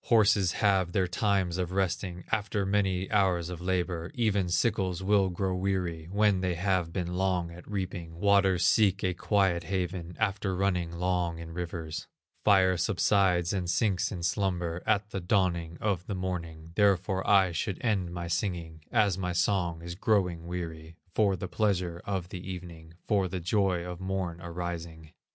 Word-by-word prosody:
Horses 100 -5 +4
have 95 -4 +2
their 95 -2 +2
times 95 -2 0
of 90 0 -2
resting 90 -1 -1
After 105 -2 0
many 95 -2 +1
hours 95 -5 +2
of 90 -1 -7
labor; 90 -2 -1
Even 105 -6 +1
sickles 95 -2 0
will 100 -1 +3
grow 95 +1 -1
weary 90 -4 -2
When 100 -2 +3
they 90 -2 0
have 90 -1 0
been 90 -1 -3
long 90 -2 0
at 85 +3 -12
reaping; 90 -4 -4
Waters 95 -2 +4
seek 100 -3 +3
a 90 -1 +1
quiet 90 -2 +1
haven 90 -1 -3
After 100 -2 0
running 90 -3 0
long 90 -1 -1
in 85 0 -8
rivers; 85 -1 -5 0.4
Fire 95 -3 +5
subsides 90 -1 +2
and 90 -3 -2
sinks 95 0 +1
in 90 -4 -5
slumber 90 -2 -1
At 105 -1 +1
the 95 - -2
dawning 85 -3 0
of 95 -5 -1
the 100 - -2
morning; 85 -3 -5
Therefore 95 -1 +2
I 95 -3 +5
should 85 +3 -2
end 100 -7 0
my 85 0 -4
singing, 85 -3 -2
As 105 -5 +2
my 90 -1 -1
song 85 -3 0
is 85 0 -5
growing 90 -4 0
weary, 85 -2 -6 0.2
For 100 -3 +3
the 95 +1 -5
pleasure 90 -5 0
of 95 -3 -3
the 90 - -6
evening, 85 -3 -8
For 100 -4 +2
the 95 0 -4
joy 90 -1 +1
of 90 -1 -6
morn 95 -3 -3
arising. 85 -2 -6
90 Hz, 165 wpm, -29 LUFS, 85-100 Hz, 0.4 s, Fire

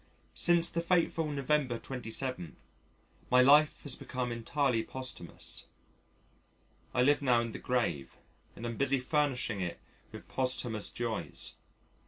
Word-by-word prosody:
Since 170 -1 +3
the 170 - -1
fateful 170 -2 +1
Nov. 140 -2 -4
27th, 130 - -1 0.7
my 125 - +6
life 150 +3 +5
has 145 - -1
become 125 -2 -4
entirely 120 +1 0
posthumous. 130 -8 -6 1.3
I 125 - +2
live 145 +2 +4
now 125 -4 +4
in 115 -1 -3
the - - -7
grave 120 - -1 0.4
and 115 - -7
am 115 -1 -4
busy 140 -1 +2
furnishing 130 -6 0
it 85 -2 -3 0.3
with - - -10
posthumous 125 -5 -1
joys. 120 -2 -2
130 Hz, 125 wpm, -32 LUFS, 120-145 Hz, 1.3 s, my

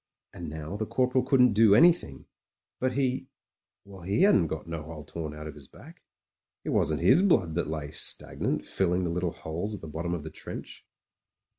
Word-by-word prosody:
And 85 -3 -7
now 80 +5 -6
the 110 0 -3
Corporal 130 0 +1
couldn't 125 -3 +4
do 105 -1 +6
anything, 170 +7 +4 0.5
but 130 0 0
he 130 0 -1 0.3
— - - -38
^well, 95 -3 -12
he 100 - +1
hadn't 105 - +5
got 80 0 -5
no 85 -2 -5
hole 80 0 -9
torn 75 -1 -6
out 75 0 -8
of 75 - -7
his 70 -2 -13
back. - - -15 0.6
It - - -4
wasn't 80 0 +1
his 90 - +5
blood 95 - +3
that 85 +1 -1
lay 75 -2 -4
stagnant, - - -1
filling 90 -1 0
the 85 - -1
little 90 +1 -1
holes 85 +8 -5
at - - -10
the 80 - -8
bottom 85 +3 -3
of 80 - -6
the 80 - -7
trench. - - -9
90 Hz, 195 wpm, -28 LUFS, 80-120 Hz, 0.6 s, do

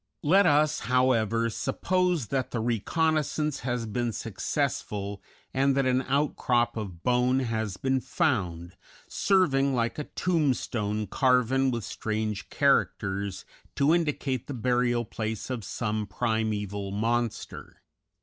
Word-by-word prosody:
Let 185 +5 +5
us, 150 0 +3
however, 115 -3 +2
suppose 180 - 0
that 135 -2 -1
the 120 - -3
reconnaissance 150 +6 0
has 120 -2 -2
been 120 +2 -1
successful, 105 -3 -3 0.3
and 135 +1 +2
that 135 - +2
an 130 0 +2
outcrop 130 -3 +1
of 95 -7 -6
bone 125 +1 +2
has 110 -5 -2
been 130 +3 +1
found, 95 - -1 0.3
serving 140 -9 +2
like 120 +3 -1
a 150 - -3
tombstone 125 - 0
carven 130 +3 +2
with 120 -3 -2
strange 110 -1 -3
characters 95 -1 0 0.3
to 140 +3 +3
indicate 150 -6 -1
the 140 - -5
burial 120 0 +1
place 110 +3 -4
of 120 -4 -3
some 105 0 -2
primeval 105 -2 -2
monster. 115 +3 -3
120 Hz, 120 wpm, -27 LUFS, 110-135 Hz, 0.3 s, Let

